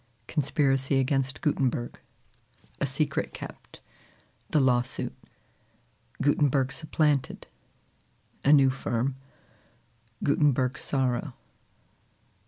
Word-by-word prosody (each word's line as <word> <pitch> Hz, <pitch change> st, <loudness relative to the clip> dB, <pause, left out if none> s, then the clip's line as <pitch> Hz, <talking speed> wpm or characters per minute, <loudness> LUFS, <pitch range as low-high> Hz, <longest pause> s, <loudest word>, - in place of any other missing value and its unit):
Conspiracy 135 Hz, -2 st, +1 dB
against 135 Hz, 0 st, 0 dB
Gutenberg. 130 Hz, -5 st, -1 dB, 0.8 s
A 140 Hz, -, +1 dB
Secret 140 Hz, +2 st, -1 dB
kept. -, -, -10 dB, 0.7 s
The 155 Hz, -, +3 dB
Lawsuit. 125 Hz, -1 st, +1 dB, 1.1 s
Gutenberg 140 Hz, -2 st, +2 dB
supplanted. 150 Hz, -4 st, 0 dB, 1.0 s
A 140 Hz, -, +5 dB
New 135 Hz, -3 st, +6 dB
Firm. 130 Hz, 0 st, -2 dB, 1.1 s
Gutenberg's 140 Hz, -2 st, +2 dB
Sorrow. 130 Hz, -3 st, -1 dB
135 Hz, 70 wpm, -27 LUFS, 130-145 Hz, 1.1 s, New